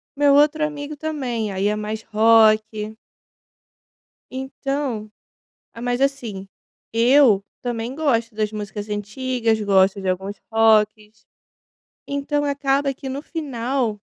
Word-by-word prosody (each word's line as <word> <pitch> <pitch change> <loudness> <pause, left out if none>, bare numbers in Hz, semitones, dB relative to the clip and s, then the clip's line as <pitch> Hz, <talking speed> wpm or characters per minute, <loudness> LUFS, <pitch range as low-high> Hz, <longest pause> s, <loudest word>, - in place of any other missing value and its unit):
meu 285 0 +4
outro 300 +2 +4
amigo 295 0 -5
também. 260 -8 -3
Aí 195 +1 0
é 210 - +1
mais 215 +1 -4
rock 220 -1 +3 1.4
então 265 -4 -4 0.6
ah, 230 - -10
mas 245 +1 -1
assim, 240 -9 -2 0.5
eu 235 -3 +5 0.2
também 240 +1 -3
gosto 235 -7 0
das 215 0 -1
músicas 210 0 -6
antigas, 225 +2 -1
gosto 195 -1 +3
de 190 - -3
alguns 190 +2 -2 0.2
rocks, 215 -1 +2 0.8
então 280 +1 -1
acaba 280 0 0
que 265 0 -8
no 275 +2 -4
final 255 -8 -2
230 Hz, 115 wpm, -22 LUFS, 215-275 Hz, 1.4 s, eu